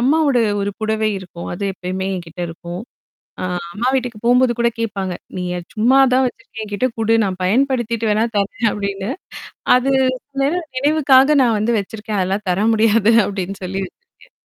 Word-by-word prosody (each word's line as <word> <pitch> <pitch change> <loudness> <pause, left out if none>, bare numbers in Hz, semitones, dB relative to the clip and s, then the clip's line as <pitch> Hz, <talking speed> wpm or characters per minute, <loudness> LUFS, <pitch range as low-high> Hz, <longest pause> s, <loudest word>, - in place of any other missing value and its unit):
அம்மாவோட 280 +1 +3 0.2
ஒரு 200 - -1
புடவை 220 0 0
இருக்கும். 175 -2 -9
அது 190 +3 -4
எப்பயுமே 185 0 -4
என்கிட்ட 175 -1 -7
இருக்கும். 175 +3 -7 0.6
அ - - -2 0.3
அம்மா 235 +5 0
வீட்டுக்குப் 245 -5 -2
போகும்போது 250 +1 +4
கூடக் 235 -1 +1
கேப்பாங்க. 195 -5 -2 0.2
"நீ 180 - -3
அத 175 - -6
சும்மாதான் 260 +3 +4
வச்சிருக்க. 225 -2 -8
என்கிட்ட 210 +4 -1
குடு 225 0 +2
நான் 185 -2 -3
பயன்படுத்திட்டு 235 0 +1
வேண்னா 215 +2 +2
தரேன்." 205 +3 0
அப்பிடின்னு. 200 +1 -3 0.7
அது 255 +2 +1 0.5
நினைவு 310 +6 +1 0.2
நினைவுக்காக 285 0 +4
நான் 230 -3 +3
வந்து 230 +3 +1
வச்சிருக்கேன். 210 +1 -4
அதெல்லாம் 195 +3 -1
தர 195 +4 +1
முடியாது 220 0 +4
அப்பிடின்னு 195 0 -4
சொல்லி 190 +2 -3
வச்சுருக்கேன். 485 - -22
220 Hz, 155 wpm, -19 LUFS, 195-250 Hz, 0.7 s, போகும்போது